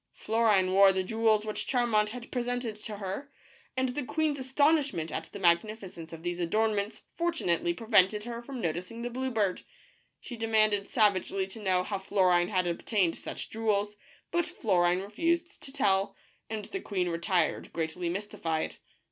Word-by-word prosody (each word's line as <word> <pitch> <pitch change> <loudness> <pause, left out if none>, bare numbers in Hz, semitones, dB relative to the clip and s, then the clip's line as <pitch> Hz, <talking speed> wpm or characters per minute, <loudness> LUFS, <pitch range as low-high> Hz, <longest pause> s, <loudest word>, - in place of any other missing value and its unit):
Florine 215 -4 +2
wore 195 0 +7
the 190 0 0
jewels 220 +1 +2
which 215 - -3
Charmant 235 -5 +2
had 240 +1 -8
presented 245 -2 -2
to 215 -1 -7
her, 200 +9 -5 0.5
and 260 0 +2
the 260 +3 -3
queen's 295 +1 0
astonishment 275 - +2
at - - -3
the - - -10
magnificence 180 -1 0
of 165 0 -9
these 175 0 -2
adornments 210 +4 0
for 340 0 0
tunately 175 - 0
prevented 210 -2 +3
her 235 0 -5
from 260 +1 -7
noticing 180 +6 -3
the 245 - -3
blue 260 +2 -2
bird. 210 -6 0 0.6
She 245 - -8
demanded 215 -3 +2
savagely 195 -3 +2
to 195 +3 -8
know 185 -2 +2
how 200 +1 -3
Florine 185 -3 +3
had 185 -3 +1
obtained 175 +1 0
such - - -6
jewels, 210 -2 0 0.4
but 345 -1 +1
Florine 180 -3 +2
refused 335 - -1
to 270 - -7
tell, 195 -7 +1 0.3
and 215 -2 -4
the 380 - -5
queen 185 -3 -1
retired 170 +1 0
greatly 165 +1 -2
mystified. 170 -4 -3
210 Hz, 160 wpm, -29 LUFS, 185-235 Hz, 0.6 s, wore